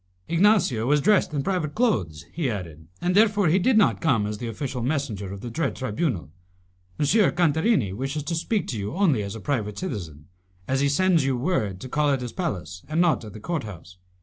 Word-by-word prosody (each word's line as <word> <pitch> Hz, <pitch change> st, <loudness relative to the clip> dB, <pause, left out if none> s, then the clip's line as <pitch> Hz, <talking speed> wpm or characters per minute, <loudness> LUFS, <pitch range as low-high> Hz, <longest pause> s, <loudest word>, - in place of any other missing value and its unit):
"Ignacio 170 Hz, -, +3 dB
was 150 Hz, +2 st, +4 dB
dressed 205 Hz, +4 st, +3 dB
in 145 Hz, -2 st, -2 dB
private 160 Hz, -4 st, -1 dB
clothes," 90 Hz, -, 0 dB
he 155 Hz, -5 st, -1 dB
added, 80 Hz, -7 st, -6 dB
"and 180 Hz, +1 st, 0 dB
therefore 205 Hz, -4 st, +4 dB
he 180 Hz, +5 st, +4 dB
did 225 Hz, +5 st, +3 dB
not 210 Hz, -, +3 dB
come 125 Hz, -11 st, +2 dB
as 105 Hz, 0 st, -4 dB
the 120 Hz, -, -4 dB
official 125 Hz, +2 st, -4 dB
messenger 115 Hz, -8 st, -2 dB
of 100 Hz, 0 st, -7 dB
the 120 Hz, -, -6 dB
dread 165 Hz, +8 st, -1 dB
tribunal. 115 Hz, -, -2 dB, 0.7 s
M. 145 Hz, -, +2 dB
Cantarini 170 Hz, -, +2 dB
wishes 135 Hz, +7 st, -3 dB
to 155 Hz, -, -3 dB
speak 195 Hz, +6 st, -1 dB
to 115 Hz, -, -3 dB
you 100 Hz, +8 st, -4 dB
only 170 Hz, -, +2 dB
as 100 Hz, +1 st, -5 dB
a -, -, -6 dB
private 105 Hz, -4 st, -2 dB
citizen, 85 Hz, -, -6 dB, 0.4 s
as 135 Hz, 0 st, +1 dB
he 140 Hz, 0 st, +2 dB
sends 175 Hz, +1 st, +3 dB
you 135 Hz, -1 st, 0 dB
word 115 Hz, -, -1 dB
to -, -, -6 dB
call 150 Hz, +3 st, +1 dB
at 135 Hz, -2 st, +1 dB
his 120 Hz, -2 st, -5 dB
palace 95 Hz, -, -4 dB
and 155 Hz, +2 st, 0 dB
not 170 Hz, -7 st, +3 dB
at 105 Hz, -3 st, -9 dB
the 110 Hz, -, -9 dB
court 165 Hz, +6 st, -3 dB
house. 90 Hz, -3 st, -11 dB
135 Hz, 210 wpm, -25 LUFS, 105-170 Hz, 0.7 s, was